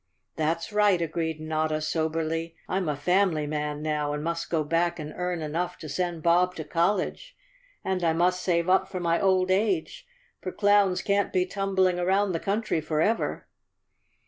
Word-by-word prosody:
" - - -52
That's 165 +5 -1
right," 205 -3 +4
agreed 160 -1 -2
Notta 155 0 -1
soberly. 160 +1 -2
" - - -34
I'm 185 -3 -1
a 150 - 0
family 175 +1 +1
man 150 0 -3
now 150 -1 -1
and 150 0 -3
must 170 +1 -3
go 160 -2 +1
back 170 +3 0
and 155 -1 -6
earn 180 -2 -2
enough 165 +4 -3
to 155 - -9
send 170 +2 -3
Bob 180 +2 +3
to 160 - -5
college, 190 - -1 0.5
and 190 -1 -1
I 165 - +3
must 180 +2 +1
save 170 -1 +1
up 190 +1 +3
for 185 - -4
my 170 -1 +1
old 185 -1 +3
age, 195 - 0 0.3
for 185 - -4
clowns 205 -2 +3
can't 200 0 +1
be 180 -1 +2
tumbling 190 -1 +1
around 190 +3 +2
the 165 - -1
country 200 -4 -1
forever." 160 +9 0
170 Hz, 175 wpm, -26 LUFS, 160-190 Hz, 0.5 s, right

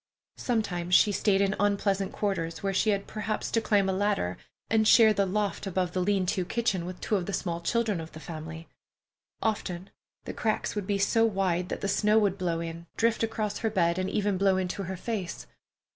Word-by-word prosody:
Sometimes 180 -7 0
she 210 - +6
stayed 200 0 +2
in 200 +1 +1
unpleasant 200 -1 +1
quarters, 170 -5 -2
where 195 0 0
she 215 +3 +2
had 200 -1 0
perhaps 215 0 -3
to 225 - +2
climb 205 -3 +2
a 190 - +1
ladder, 195 - 0 0.3
and 220 -1 +2
share 220 -2 +7
the 200 -1 +1
loft 205 +1 -1
above 185 -2 -1
the 185 - -1
lean 195 0 +1
to 185 0 0
kitchen 190 -3 -1
with 180 0 -7
two 210 - 0
of 180 - -4
the 200 - -3
small 170 -3 -2
children 215 -2 0
of 160 - -9
the 155 - -9
family. 160 0 -8 0.8
Often 190 -4 -2 0.3
the - - -6
cracks 220 -2 -1
would 205 -3 -4
be 200 - +1
so 215 +3 +3
wide 190 -4 0
that - - -4
the - - -1
snow 210 +2 +3
would 200 -3 +2
blow 170 -2 -1
in, 170 0 -6
drift 230 0 +2
across 215 -2 -2
her 225 - 0
bed, 175 -4 +1
and 185 - -1
even 205 -3 0
blow 195 -1 +3
into 185 +1 -2
her 190 +1 -5
face. 195 -4 -4
195 Hz, 205 wpm, -28 LUFS, 180-210 Hz, 0.8 s, share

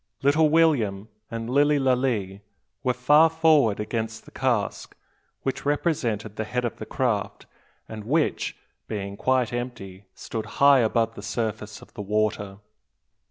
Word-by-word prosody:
Little 150 +3 +4
William 120 -11 +2 0.2
and 115 0 -5
Lilly 145 +4 +3
Lalee 125 -7 0 0.4
were 130 - +2
far 150 +6 +5
forward 155 -10 +3
against 110 +1 -4
the - - -15
cask 120 -6 -2 0.5
which 135 - -3
represented 120 - -1
the 110 - -1
head 125 +3 -2
of 120 - -4
the 110 - -8
craft, 115 -6 -2 0.4
and 110 -1 -8
which, 150 +6 0 0.3
being 100 -2 -4
quite 130 +1 +1
empty, 105 -6 -6
stood 110 -2 -5
high 140 -1 +6
above 115 0 +1
the - - -9
surface 110 -1 -4
of - - -18
the 110 - -6
water. 105 -1 -1
115 Hz, 140 wpm, -25 LUFS, 105-135 Hz, 0.5 s, high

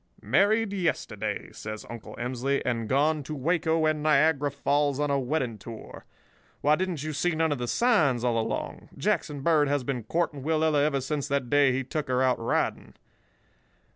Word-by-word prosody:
"'Married 215 +1 +2
yesterday,' 185 -4 -2
says 110 0 -7
Uncle 115 -2 -9
Emsley, 130 +3 -1
'and 115 -3 -1
gone 150 +3 +2
to 150 +2 -6
Waco 160 +2 +1
and 155 -1 +1
Niagara 150 -1 +3
Falls 140 0 0
on 145 -1 0
a 140 - +2
wedding 125 -4 -2
tour. 110 +2 -10 0.6
Why, 150 +1 +4
didn't 180 -4 -3
you 155 0 -3
see 160 +3 0
none 160 0 +1
of 145 - -1
the 120 - -3
signs 150 - +2
all 120 -2 +1
along? 110 - -4
Jackson 145 -2 -1
Bird 150 -1 +3
has 145 -1 0
been 125 -1 -2
courting 160 0 -1
Willella 155 0 +2
ever 140 -2 +1
since 145 +1 -2
that 140 -4 -1
day 145 -2 +5
he 130 +1 -1
took 150 +3 -4
her 130 0 +1
out 130 -1 +2
riding. 115 - -1
145 Hz, 175 wpm, -27 LUFS, 130-155 Hz, 0.6 s, day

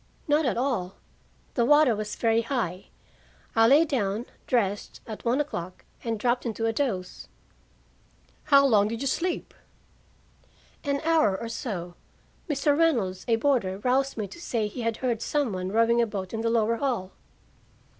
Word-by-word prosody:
"Not 295 -1 +3
at 245 - 0
all. 235 -8 -1 0.6
The 240 - +2
water 295 -2 +5
was 210 0 -4
very 230 -1 +2
high. 225 -7 -3 0.7
I 225 0 +6
lay 290 +6 +6
down, 230 -6 -1 0.2
dressed, 205 -5 -1
at 220 -2 -8
one 245 +3 +1
o'clock, 185 - -4 0.2
and 225 -2 -2
dropped 245 +2 +1
into 225 -1 -2
a 225 - +1
doze." 205 -9 -3 1.2
"How 280 -1 +6
long 210 -6 +4
did 230 +2 -4
you - - -2
sleep?" 350 +6 -2 1.3
"An 280 -1 -1
hour 315 -12 +2
or 230 - -5
so. 180 -8 -5 0.6
Mr. 290 0 +2
Reynolds, 240 - +1
a 230 - +4
boarder, 225 -7 +1
roused 260 +5 0
me 210 -2 -2
to 340 - -11
say 230 -9 -1
he 210 +4 -5
had 230 -1 -1
heard 240 -3 -1
some 285 -8 0
one 185 0 -3
rowing 230 +2 +3
a 235 - +1
boat 195 -2 -5
in 225 - -2
the 230 - 0
lower 230 0 +2
hall." 230 -8 -2
230 Hz, 165 wpm, -26 LUFS, 210-275 Hz, 1.3 s, I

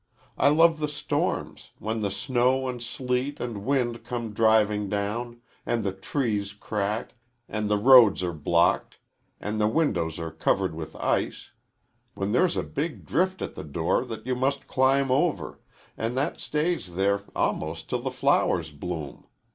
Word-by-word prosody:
I - - +4
love 160 +1 +5
the 150 - 0
storms, 150 0 -3
when 110 +1 -3
the 100 - 0
snow 130 +5 +1
and 125 -1 -4
sleet 125 +4 -2
and 115 -5 -4
wind 120 -2 0
come 120 -2 -4
driving 105 -2 +3
down, 115 +4 -3 0.2
and 115 -2 -1
the 100 - 0
trees 100 0 -2
crack, 105 +1 -3 0.3
and 105 -1 -2
the 105 - +3
roads 115 -4 +7
are 90 -1 -1
blocked, 85 +3 +1 0.4
and 105 +1 -2
the 105 - +4
windows 100 - 0
are 80 -1 -4
covered - - 0
with 80 -1 -7
ice; - - -1 0.6
when 100 +1 -2
there's 170 +10 +2
a - - 0
big 155 +3 -4
drift 185 +2 0
at - - -5
the - - -7
door 80 - 0
that 115 -2 -7
you 130 - 0
must 135 +2 0
climb 135 +1 +2
over, 145 +4 0 0.4
and 115 +3 -3
that 135 - -1
stays 150 - -2
there 100 +2 +2
almost 80 +1 -1
till 125 - -2
the 130 - -2
flowers 125 - +1
bloom. 75 -1 -6
115 Hz, 160 wpm, -26 LUFS, 100-130 Hz, 0.6 s, roads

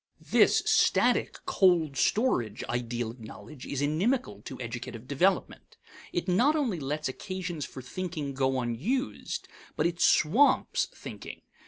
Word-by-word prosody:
This - - +5
static, - - +3
cold 170 -7 +3
storage 130 - +1
ideal 120 -1 -3
of 120 - -15
knowledge 115 +4 -10
is 140 0 -2
inimical 155 - 0
to 130 - -7
educative 120 0 -6
development. 180 +7 0 0.3
It 175 +1 -2
not 245 +12 +3
only 245 - 0
lets 150 +2 -2
occasions 175 +1 -5
for 130 - -10
thinking 155 -1 -4
go 130 -1 +1
unused, 165 - -2 0.3
but 150 - 0
it 170 0 -1
swamps 260 - +4
thinking. - - -10
150 Hz, 130 wpm, -28 LUFS, 125-185 Hz, 0.3 s, This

